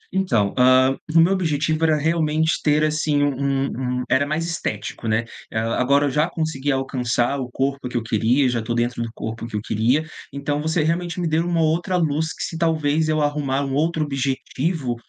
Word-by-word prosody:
Então, 120 Hz, -, +1 dB
hã, 130 Hz, +1 st, +5 dB, 0.2 s
o 165 Hz, -, +8 dB
meu 175 Hz, +4 st, +5 dB
objetivo 155 Hz, -3 st, 0 dB
era 155 Hz, -1 st, +4 dB
realmente 160 Hz, 0 st, +1 dB
ter, 150 Hz, 0 st, +3 dB
assim, 150 Hz, -1 st, +1 dB
um 135 Hz, -2 st, -1 dB
um -, -, -2 dB
era 140 Hz, +2 st, +2 dB
mais 155 Hz, +3 st, -1 dB
estético, 115 Hz, -8 st, -4 dB
né. 110 Hz, +1 st, +1 dB, 0.3 s
Hã, 110 Hz, +1 st, -1 dB
agora 140 Hz, +3 st, +3 dB
eu -, -, +1 dB
já 150 Hz, +4 st, +1 dB
consegui 145 Hz, -3 st, -2 dB
alcançar 130 Hz, 0 st, 0 dB
o 125 Hz, -2 st, -4 dB
corpo 135 Hz, 0 st, -2 dB
que 125 Hz, -, -2 dB
eu 115 Hz, -, -2 dB
queria, 115 Hz, +5 st, +2 dB
já 120 Hz, -2 st, 0 dB
estou 115 Hz, +1 st, -3 dB
dentro 120 Hz, 0 st, -1 dB
do 115 Hz, -, -3 dB
corpo 115 Hz, +1 st, -5 dB
que 110 Hz, -, -7 dB
eu 105 Hz, -, -1 dB
queria, 120 Hz, +9 st, +1 dB, 0.3 s
então 145 Hz, +1 st, -2 dB
você 160 Hz, 0 st, 0 dB
realmente 170 Hz, +2 st, -1 dB
me 175 Hz, -, 0 dB
deu 160 Hz, +2 st, +1 dB
uma 170 Hz, -2 st, +1 dB
outra 170 Hz, +4 st, +1 dB
luz, 160 Hz, -1 st, 0 dB
que, -, -, -6 dB
se 165 Hz, -, -4 dB
talvez 160 Hz, -2 st, +1 dB
eu 155 Hz, -1 st, +1 dB
arrumar 145 Hz, -2 st, 0 dB
um 135 Hz, -, -3 dB
outro 160 Hz, +2 st, +1 dB
objetivo, 135 Hz, 0 st, -2 dB
145 Hz, 200 wpm, -22 LUFS, 125-160 Hz, 0.3 s, o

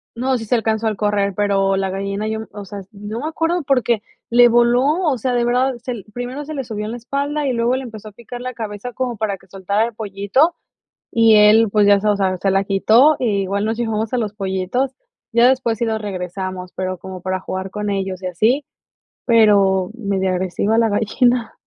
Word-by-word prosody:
No, 255 Hz, +2 st, 0 dB
sí 225 Hz, -, -6 dB
se 245 Hz, -, +1 dB
alcanzó 220 Hz, -1 st, 0 dB
al 215 Hz, -, 0 dB
correr, 205 Hz, -1 st, 0 dB
pero 195 Hz, -1 st, +1 dB
la 195 Hz, -1 st, -1 dB
gallina 200 Hz, +2 st, -3 dB
yo 220 Hz, 0 st, -2 dB
m 220 Hz, -, -7 dB
o 205 Hz, -1 st, -8 dB
sea, 200 Hz, +1 st, -7 dB
no 210 Hz, +2 st, -6 dB
me 300 Hz, -, -3 dB
acuerdo 330 Hz, +2 st, -1 dB
porque, 240 Hz, -5 st, +1 dB, 0.3 s
le 240 Hz, 0 st, +6 dB
voló, 240 Hz, +2 st, +4 dB, 0.2 s
o 285 Hz, -6 st, +1 dB
sea, 250 Hz, +3 st, -1 dB
de 240 Hz, -1 st, +1 dB
verdad, 255 Hz, +2 st, +1 dB
se 245 Hz, +2 st, -6 dB
l 210 Hz, -5 st, -8 dB
primero 250 Hz, +4 st, -5 dB
se 310 Hz, +2 st, -7 dB
le 275 Hz, -, -3 dB
subió 210 Hz, -2 st, -5 dB
en 215 Hz, -, -4 dB
la 240 Hz, -, -5 dB
espalda 280 Hz, +4 st, -2 dB
y 260 Hz, -, 0 dB
luego 235 Hz, +2 st, +1 dB
le 265 Hz, -, -5 dB
empezó 220 Hz, -3 st, -9 dB
a -, -, -17 dB
picar 240 Hz, +3 st, -9 dB
la 255 Hz, 0 st, -5 dB
cabeza 220 Hz, +1 st, -6 dB
como 250 Hz, -2 st, -2 dB
para 205 Hz, -2 st, -2 dB
que 190 Hz, -, -23 dB
soltara 195 Hz, +3 st, -1 dB
el 235 Hz, -, -6 dB
pollito, 210 Hz, -, +1 dB, 0.6 s
y 225 Hz, -1 st, +5 dB
él, 215 Hz, +1 st, +6 dB
pues 210 Hz, -1 st, +4 dB
ya 200 Hz, -1 st, +6 dB
se 215 Hz, -, -1 dB
o 205 Hz, -, +3 dB
sea, 190 Hz, -2 st, 0 dB
se 195 Hz, +2 st, 0 dB
la 195 Hz, 0 st, +2 dB
quitó 225 Hz, +10 st, +4 dB
y 205 Hz, -6 st, 0 dB
igual 200 Hz, +2 st, -2 dB
nos 225 Hz, -, -1 dB
llevamos 225 Hz, -1 st, -2 dB
a 250 Hz, -, +2 dB
los 215 Hz, -3 st, -2 dB
pollitos. 195 Hz, +6 st, -2 dB, 0.4 s
Ya 235 Hz, +1 st, +5 dB
después 245 Hz, -4 st, +1 dB
sí 235 Hz, -, +1 dB
los 220 Hz, -1 st, -1 dB
regresamos, 185 Hz, -1 st, -5 dB
pero 185 Hz, 0 st, -3 dB
como 190 Hz, -1 st, -8 dB
para 185 Hz, 0 st, -2 dB
jugar 190 Hz, 0 st, -5 dB
con 210 Hz, 0 st, -3 dB
ellos 190 Hz, -1 st, -3 dB
y 185 Hz, -, -3 dB
así, 230 Hz, -, +1 dB, 0.6 s
pero 200 Hz, -5 st, +4 dB
medio 200 Hz, -5 st, -1 dB
agresiva 190 Hz, +4 st, 0 dB
la 230 Hz, -1 st, +3 dB
gallina. 230 Hz, +3 st, +1 dB
215 Hz, 225 wpm, -19 LUFS, 195-240 Hz, 0.6 s, le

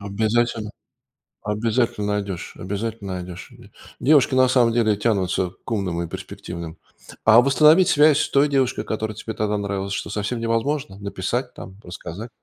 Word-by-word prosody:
Обязательно. 110 Hz, +2 st, -1 dB, 0.7 s
Обязательно 115 Hz, +1 st, 0 dB
найдешь, 100 Hz, -3 st, -4 dB
обязательно 100 Hz, 0 st, -4 dB
найдешь. 90 Hz, -1 st, -8 dB
Ве -, -, -17 dB, 0.3 s
девушки 140 Hz, -2 st, +4 dB
на 130 Hz, 0 st, +5 dB
самом 125 Hz, -3 st, +3 dB
деле 110 Hz, -3 st, +2 dB
тянутся 95 Hz, -4 st, 0 dB
к -, -, -8 dB
умным 95 Hz, -6 st, -1 dB
и -, -, -5 dB
перспективным. 85 Hz, 0 st, -8 dB, 0.5 s
А 110 Hz, +2 st, +8 dB
восстановить 155 Hz, +7 st, +5 dB
связь 150 Hz, 0 st, +5 dB
с -, -, 0 dB
той 140 Hz, +1 st, +4 dB
девушкой, 135 Hz, -3 st, 0 dB
которая 110 Hz, -1 st, -3 dB
тебе 110 Hz, +1 st, -6 dB
тогда 105 Hz, -1 st, -1 dB
нравилась, 100 Hz, -1 st, -3 dB
что, -, -, -4 dB
совсем 105 Hz, +4 st, -2 dB
невозможно? 115 Hz, -1 st, -1 dB
Написать 105 Hz, +6 st, -3 dB
там, 95 Hz, +1 st, -10 dB
рассказать? 90 Hz, +5 st, -8 dB
110 Hz, 150 wpm, -22 LUFS, 100-120 Hz, 0.7 s, А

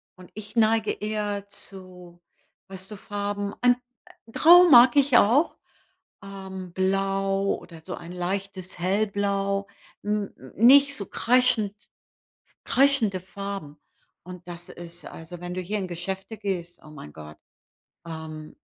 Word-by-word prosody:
und 185 Hz, -1 st, -15 dB
ich 215 Hz, +1 st, -10 dB
neige 220 Hz, -1 st, +3 dB
eher 205 Hz, -1 st, -3 dB
zu 180 Hz, -3 st, -11 dB, 0.5 s
weißt 190 Hz, +1 st, -8 dB
du, 210 Hz, -, -6 dB
Farben, 205 Hz, 0 st, -4 dB
ein 245 Hz, 0 st, +4 dB, 0.6 s
grau 350 Hz, +5 st, +7 dB
mag 245 Hz, -1 st, +8 dB
ich 275 Hz, -3 st, +5 dB
auch, 255 Hz, +10 st, +3 dB, 0.7 s
ähm, 190 Hz, -2 st, -8 dB
blau 195 Hz, +1 st, 0 dB
oder 165 Hz, -2 st, -13 dB
so 185 Hz, -, -6 dB
ein 175 Hz, +1 st, -10 dB
leichtes 185 Hz, +1 st, -4 dB
hellblau, 200 Hz, +1 st, 0 dB, 0.4 s
mm, 210 Hz, -1 st, -1 dB, 0.3 s
nicht 280 Hz, +5 st, +6 dB
so 200 Hz, -, -3 dB
kreischend 240 Hz, -4 st, +2 dB, 0.9 s
kreischende 260 Hz, -8 st, +3 dB
Farben. 195 Hz, -5 st, -7 dB, 0.5 s
Und, 180 Hz, 0 st, -11 dB
das 175 Hz, 0 st, -9 dB
ist 170 Hz, 0 st, -10 dB
also, 165 Hz, +2 st, -10 dB
wenn 175 Hz, 0 st, -5 dB
du 185 Hz, -, -3 dB
hier 205 Hz, +4 st, -3 dB
in 190 Hz, -, -4 dB
Geschäfte 190 Hz, +5 st, -5 dB
gehst, 180 Hz, -4 st, -4 dB
oh 155 Hz, -, -13 dB
mein 75 Hz, -, -11 dB
Gott, 75 Hz, 0 st, -11 dB, 0.7 s
ähm, 160 Hz, -1 st, -8 dB
195 Hz, 130 wpm, -25 LUFS, 180-210 Hz, 0.9 s, mag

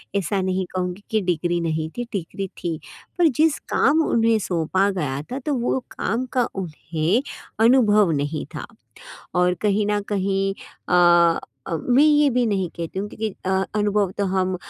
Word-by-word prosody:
ऐसा 200 Hz, 0 st, 0 dB
नहीं 185 Hz, 0 st, -1 dB
कहूँगी 180 Hz, +2 st, -3 dB
कि 220 Hz, -, +2 dB
डिग्री 175 Hz, -1 st, 0 dB
नहीं 160 Hz, -1 st, -2 dB
थी, 245 Hz, -, -1 dB
डिग्री 195 Hz, +1 st, -4 dB
थी, 165 Hz, -2 st, -3 dB, 0.4 s
पर 345 Hz, -, +5 dB
जिस 315 Hz, -1 st, +4 dB, 0.2 s
काम 315 Hz, +2 st, +4 dB
उन्हें 225 Hz, -1 st, +3 dB
सौंपा 185 Hz, +1 st, 0 dB
गया 145 Hz, -7 st, -2 dB
था, 260 Hz, -, -3 dB
तो 290 Hz, +2 st, -2 dB
वो 245 Hz, +2 st, 0 dB, 0.2 s
काम 230 Hz, +6 st, -1 dB
का 250 Hz, -2 st, +2 dB
उन्हें 165 Hz, +3 st, -1 dB, 0.4 s
अनुभव 215 Hz, -7 st, +5 dB
नहीं 145 Hz, +1 st, -2 dB
था। -, -, -5 dB, 0.7 s
और 180 Hz, 0 st, +3 dB
कहीं 205 Hz, 0 st, +2 dB
न 210 Hz, 0 st, +1 dB
कहीं 195 Hz, 0 st, 0 dB, 0.4 s
अ 175 Hz, -1 st, +5 dB, 0.3 s
अ, 165 Hz, -, -1 dB
मैं 250 Hz, -, +3 dB
ये 295 Hz, -1 st, +5 dB
भी 250 Hz, 0 st, +1 dB
नहीं 195 Hz, -5 st, 0 dB
कहती 170 Hz, +2 st, -5 dB
हूँ 205 Hz, +2 st, -3 dB
कि 215 Hz, -1 st, -4 dB
अ, -, -, +1 dB, 0.2 s
अनुभव 205 Hz, -2 st, +1 dB
तो 200 Hz, -, +1 dB
हम 185 Hz, -1 st, 0 dB
195 Hz, 165 wpm, -22 LUFS, 175-220 Hz, 0.7 s, पर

